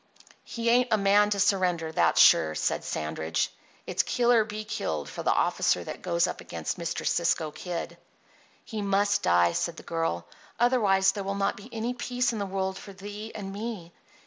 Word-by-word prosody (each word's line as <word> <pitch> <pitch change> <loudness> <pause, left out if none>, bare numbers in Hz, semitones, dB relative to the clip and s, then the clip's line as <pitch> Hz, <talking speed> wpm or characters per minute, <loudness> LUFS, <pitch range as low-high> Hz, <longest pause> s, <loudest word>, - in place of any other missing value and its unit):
"He 230 0 -1
ain't 245 +1 +4
a 220 - +3
man 205 +1 +4
to 205 -1 -1
surrender, 180 -5 +1
that's - - +2
sure," 80 -1 +6
said - - -1
Sandridge. 80 +1 -2 0.3
"It's - - +1
kill 240 -1 +1
or 230 -2 +5
be 215 0 -6
killed 80 - -3
for 75 - -6
the - - +2
officer 90 - +1
that - - -7
goes 170 -1 +1
up - - -5
against - - -5
Mr. 170 -1 -3
Cisco 165 -2 +1
Kid." 175 +2 -6 0.7
"He 220 -2 -5
must 200 0 +2
die," 85 0 +4
said 165 - -2
the - - -10
girl. 165 - -2 0.3
"Otherwise 210 -6 +4
there 200 - -5
will 195 +1 -3
not 200 0 0
be 200 - -12
any 230 +2 -2
peace 250 0 -1
in 220 - -3
the 200 - -2
world 190 0 -2
for 200 - -11
thee 205 +3 -8
and 195 -2 -6
me. 205 -5 -6
195 Hz, 190 wpm, -27 LUFS, 170-215 Hz, 0.7 s, sure